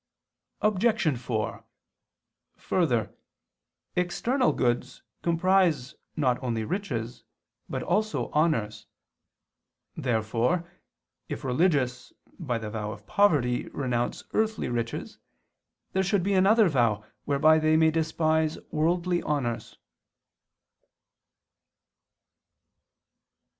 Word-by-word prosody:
Obj. 215 Hz, -, +2 dB
4: 115 Hz, -3 st, -3 dB, 0.9 s
Further, 120 Hz, -, 0 dB, 0.8 s
external 235 Hz, +9 st, +1 dB
goods 120 Hz, -1 st, -1 dB, 0.2 s
comprise 170 Hz, -5 st, +2 dB, 0.2 s
not 130 Hz, -5 st, +1 dB
only 115 Hz, -4 st, -2 dB
riches 125 Hz, -, -4 dB, 0.5 s
but -, -, -3 dB
also 215 Hz, 0 st, 0 dB
honors. 115 Hz, -10 st, 0 dB, 1.1 s
Therefore, 120 Hz, +8 st, 0 dB, 0.6 s
if -, -, -5 dB
religious, 130 Hz, -2 st, 0 dB, 0.3 s
by 130 Hz, -9 st, -1 dB
the 110 Hz, -2 st, -6 dB
vow 105 Hz, -1 st, -3 dB
of 100 Hz, -, -10 dB
poverty, 145 Hz, -12 st, +2 dB
renounce 125 Hz, -3 st, -2 dB
earthly 220 Hz, 0 st, 0 dB
riches, 115 Hz, -1 st, -4 dB, 0.7 s
there 190 Hz, -, +2 dB
should 195 Hz, -1 st, +1 dB
be 200 Hz, +2 st, +1 dB
another 200 Hz, +3 st, +5 dB
vow 115 Hz, -8 st, +1 dB, 0.2 s
whereby 155 Hz, +3 st, +4 dB
they 155 Hz, 0 st, +3 dB
may 160 Hz, 0 st, +4 dB
despise 160 Hz, -1 st, +1 dB
worldly 175 Hz, +3 st, +1 dB
honors. 120 Hz, -6 st, -3 dB
155 Hz, 85 wpm, -27 LUFS, 120-180 Hz, 1.1 s, another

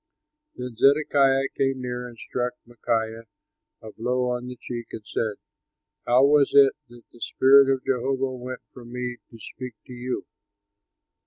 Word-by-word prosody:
Then 125 Hz, -1 st, -6 dB
Zedekiah 135 Hz, -1 st, +4 dB
came 135 Hz, -1 st, 0 dB
near 125 Hz, 0 st, -4 dB
and 120 Hz, -1 st, -13 dB
struck 125 Hz, +2 st, -3 dB
Micaiah 115 Hz, -1 st, -2 dB, 0.6 s
a 110 Hz, -, -8 dB
blow 125 Hz, +2 st, -1 dB
on 125 Hz, 0 st, -3 dB
the 125 Hz, -, -7 dB
cheek 120 Hz, -1 st, -7 dB
and 110 Hz, -, -7 dB
said, 110 Hz, 0 st, -2 dB, 0.7 s
"How 125 Hz, +3 st, +5 dB
was 145 Hz, 0 st, +4 dB
it 140 Hz, -1 st, +7 dB, 0.2 s
that 120 Hz, -1 st, -15 dB
the 120 Hz, -, -18 dB
spirit 135 Hz, +1 st, +5 dB
of 130 Hz, -1 st, -1 dB
Jehovah 135 Hz, +1 st, 0 dB
went 125 Hz, 0 st, -7 dB
from 120 Hz, -2 st, -12 dB
me 125 Hz, 0 st, -4 dB
to 115 Hz, -, -14 dB
speak 125 Hz, +2 st, -8 dB
to 125 Hz, -, -10 dB
you?" 125 Hz, +1 st, -4 dB
125 Hz, 155 wpm, -25 LUFS, 120-135 Hz, 0.7 s, it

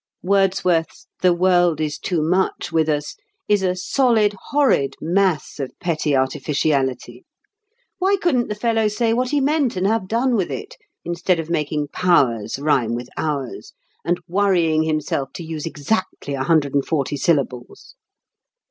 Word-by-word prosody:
Wordsworth's 185 Hz, -3 st, +1 dB, 0.2 s
"The 185 Hz, -, +5 dB
world 175 Hz, -2 st, +3 dB
is 155 Hz, -1 st, -2 dB
too 170 Hz, -5 st, -1 dB
much 180 Hz, +4 st, 0 dB
with 160 Hz, -1 st, +1 dB
us" 150 Hz, -1 st, -2 dB, 0.3 s
is 205 Hz, -1 st, +3 dB
a 185 Hz, -1 st, 0 dB
solid, 220 Hz, +1 st, +2 dB, 0.2 s
horrid 260 Hz, -, +2 dB
mass 180 Hz, -2 st, 0 dB
of 135 Hz, -2 st, -4 dB
petty 155 Hz, -4 st, 0 dB
artificiality. 130 Hz, -2 st, -1 dB, 0.8 s
Why 385 Hz, +2 st, +3 dB
couldn't 300 Hz, -11 st, +1 dB
the 210 Hz, -, -3 dB
fellow 225 Hz, 0 st, +1 dB
say 225 Hz, +2 st, 0 dB
what 250 Hz, +2 st, 0 dB
he 290 Hz, -, +1 dB
meant 280 Hz, -3 st, +1 dB
and 185 Hz, +1 st, -1 dB
have 215 Hz, -2 st, +1 dB
done 240 Hz, +4 st, +1 dB
with 190 Hz, -5 st, 0 dB
it, -, -, -6 dB, 0.3 s
instead 175 Hz, +1 st, 0 dB
of 165 Hz, +1 st, -5 dB
making 150 Hz, -2 st, -1 dB
"powers" 125 Hz, -, +1 dB
rhyme 135 Hz, -5 st, +1 dB
with 120 Hz, +1 st, -6 dB
"ours," 145 Hz, -5 st, -4 dB, 0.3 s
and 175 Hz, +1 st, 0 dB
worrying 175 Hz, -4 st, +2 dB
himself 155 Hz, -3 st, -2 dB
to 170 Hz, -, -7 dB
use 160 Hz, -1 st, -5 dB
exactly 165 Hz, -1 st, -3 dB
a 135 Hz, -1 st, -2 dB
hundred 150 Hz, -4 st, +2 dB
and 140 Hz, -1 st, +1 dB
forty 145 Hz, -3 st, -1 dB
syllables? 140 Hz, -, -2 dB
170 Hz, 150 wpm, -21 LUFS, 145-200 Hz, 0.8 s, The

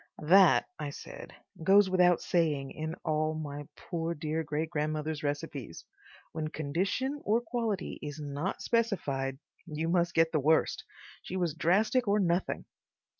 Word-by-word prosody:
"That," 180 Hz, +2 st, +6 dB
I 150 Hz, -1 st, -3 dB
said, -, -, -10 dB, 0.3 s
"goes 195 Hz, +2 st, +6 dB
without 180 Hz, -2 st, +4 dB
saying 150 Hz, -6 st, +1 dB
in 160 Hz, +1 st, -4 dB
all 155 Hz, 0 st, 0 dB
my 145 Hz, -2 st, -6 dB
poor 170 Hz, -1 st, -3 dB
dear 155 Hz, +1 st, -2 dB
great 155 Hz, +2 st, -3 dB
grandmother's 155 Hz, 0 st, -2 dB
recipes. 145 Hz, -, -4 dB, 0.5 s
When 155 Hz, -1 st, -3 dB
condition 190 Hz, -, -2 dB
or 220 Hz, +3 st, +3 dB
quality 230 Hz, -4 st, -3 dB
is 145 Hz, 0 st, -6 dB
not 145 Hz, +5 st, -3 dB
specified 145 Hz, -, 0 dB, 0.3 s
you 160 Hz, 0 st, -2 dB
must 175 Hz, -1 st, +1 dB
get 165 Hz, 0 st, +4 dB
the 155 Hz, -, +2 dB
worst. 155 Hz, +3 st, +2 dB, 0.4 s
She 185 Hz, -, -5 dB
was 175 Hz, -4 st, 0 dB
drastic 205 Hz, -, +2 dB
or 205 Hz, +1 st, +3 dB
nothing.... 175 Hz, -1 st, 0 dB
160 Hz, 140 wpm, -30 LUFS, 150-190 Hz, 0.5 s, That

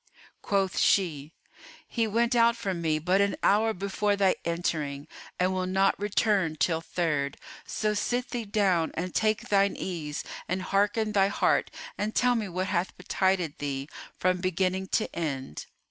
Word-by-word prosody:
Quoth 195 Hz, -2 st, 0 dB
she 155 Hz, -6 st, +2 dB, 0.6 s
"He 230 Hz, -2 st, 0 dB
went 235 Hz, +3 st, +1 dB
out 235 Hz, 0 st, +5 dB
from 190 Hz, -6 st, -3 dB
me 155 Hz, -2 st, +1 dB
but 180 Hz, +5 st, +2 dB
an 200 Hz, 0 st, +1 dB
hour 220 Hz, +3 st, +4 dB
before 200 Hz, +1 st, -1 dB
thy 195 Hz, -2 st, +3 dB
entering 155 Hz, -4 st, -2 dB, 0.3 s
and 185 Hz, +1 st, +2 dB
will 185 Hz, 0 st, -1 dB
not 190 Hz, +1 st, +2 dB
return 200 Hz, -5 st, +1 dB
till 160 Hz, +2 st, +1 dB
Third: 150 Hz, -5 st, -1 dB, 0.3 s
so 215 Hz, -1 st, -1 dB
sit 245 Hz, +4 st, -1 dB
thee 235 Hz, -2 st, -3 dB
down 195 Hz, -5 st, +2 dB
and 180 Hz, +2 st, -3 dB
take 215 Hz, -1 st, 0 dB
thine 200 Hz, -1 st, +3 dB
ease 155 Hz, -5 st, -4 dB, 0.2 s
and 185 Hz, +1 st, -2 dB
hearten 205 Hz, +3 st, +1 dB
thy 195 Hz, -2 st, +4 dB
heart 200 Hz, -, +1 dB, 0.3 s
and 215 Hz, +1 st, -2 dB
tell 250 Hz, 0 st, +4 dB
me 220 Hz, -4 st, -2 dB
what 185 Hz, +1 st, -2 dB
hath 185 Hz, -1 st, -1 dB
betided 180 Hz, -3 st, 0 dB
thee, 140 Hz, -1 st, -3 dB, 0.3 s
from 185 Hz, 0 st, +1 dB
beginning 185 Hz, +1 st, 0 dB
to 215 Hz, -, -1 dB
end." 135 Hz, -, -4 dB
190 Hz, 160 wpm, -28 LUFS, 170-205 Hz, 0.6 s, out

